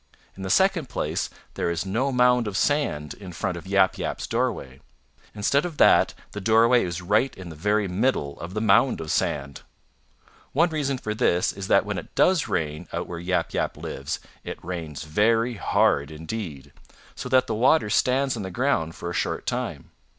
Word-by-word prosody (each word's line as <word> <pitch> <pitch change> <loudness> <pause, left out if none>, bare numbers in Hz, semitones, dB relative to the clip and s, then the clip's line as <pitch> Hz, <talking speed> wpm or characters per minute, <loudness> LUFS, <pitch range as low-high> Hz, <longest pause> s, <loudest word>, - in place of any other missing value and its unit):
In 95 - -10
the 95 - -4
second 185 - +3
place - - -2 0.2
there - - -1
is 85 +2 -2
no 120 +8 0
mound 125 -2 +3
of 100 -1 -3
sand 140 - 0
in 95 -3 -10
front 90 +1 -3
of 85 +1 -9
Yap 95 -1 +3
Yap's - - -3
doorway. 65 0 -2 0.5
Instead 125 +8 +2
of 170 -4 -5
that - - +5 0.2
the 105 - -6
doorway 115 +3 +4
is 90 0 -4
right 110 +8 +2
in 95 -2 -8
the 80 - -9
very 105 +5 +1
middle 90 - -1
of 90 +4 -7
the 105 - -1
mound 110 - +4
of - - -4
sand. 70 0 -1 0.9
One 165 +4 +3
reason 140 -4 -1
for 110 -4 -4
this 100 -6 +1
is 100 -1 -6
that - - +4
when - - -2
it - - -13
does 180 -4 +3
rain 75 -2 -2
out - - -3
where 85 - -6
Yap 90 +1 -1
Yap - - -1
lives 70 0 -5 0.2
it - - -6
rains 80 -5 -5
very 115 +9 +2
hard 70 -8 +2
indeed, 80 - -7 0.4
so 125 - -6
that 130 0 +4
the 115 - -3
water 115 0 +3
stands 135 +4 +2
on 110 - -5
the 95 - -4
ground 90 - 0
for - - -6
a 85 - -3
short - - -2
time. - - -4
105 Hz, 190 wpm, -25 LUFS, 85-125 Hz, 0.9 s, that